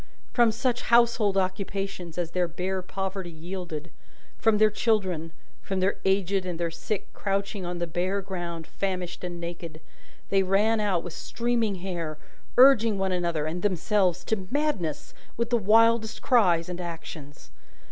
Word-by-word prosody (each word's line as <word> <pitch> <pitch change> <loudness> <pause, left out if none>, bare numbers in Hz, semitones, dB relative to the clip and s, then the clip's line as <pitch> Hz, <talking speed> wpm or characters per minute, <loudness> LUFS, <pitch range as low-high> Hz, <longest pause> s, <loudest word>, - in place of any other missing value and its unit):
From 235 -2 +5
such 245 +2 0
household 230 -4 +3
occupations 190 -2 -2
as 170 -2 -2
their 180 -1 +1
bare 185 +3 -3
poverty 190 0 -4
yielded, 170 -1 -6 0.5
from 225 -2 +3
their 215 0 +5
children, 190 -8 0 0.3
from 195 -1 -2
their 190 +2 +1
aged 195 0 +2
and 180 -2 -4
their 170 -1 -1
sick 200 +4 -4
crouching 195 -1 -2
on 175 0 -3
the 175 - -1
bare 180 +4 -1
ground 175 -3 -5
famished 185 -2 -3
and 175 -1 -5
naked, 170 -2 -6 0.5
they 195 -1 +4
ran 205 +4 +2
out 195 -5 +1
with 175 - -7
streaming 235 -2 -1
hair, 165 -5 -3 0.4
urging 230 -5 +7
one 190 -1 0
another, 170 -4 0
and 165 +3 -3
themselves, 185 -1 +1
to 195 -4 -2
madness 275 - -1 0.2
with 235 +1 -1
the 240 - +4
wildest 225 +1 +3
cries 180 -10 +4
and 180 0 -5
actions. 160 -4 -8
190 Hz, 150 wpm, -27 LUFS, 175-210 Hz, 0.5 s, urging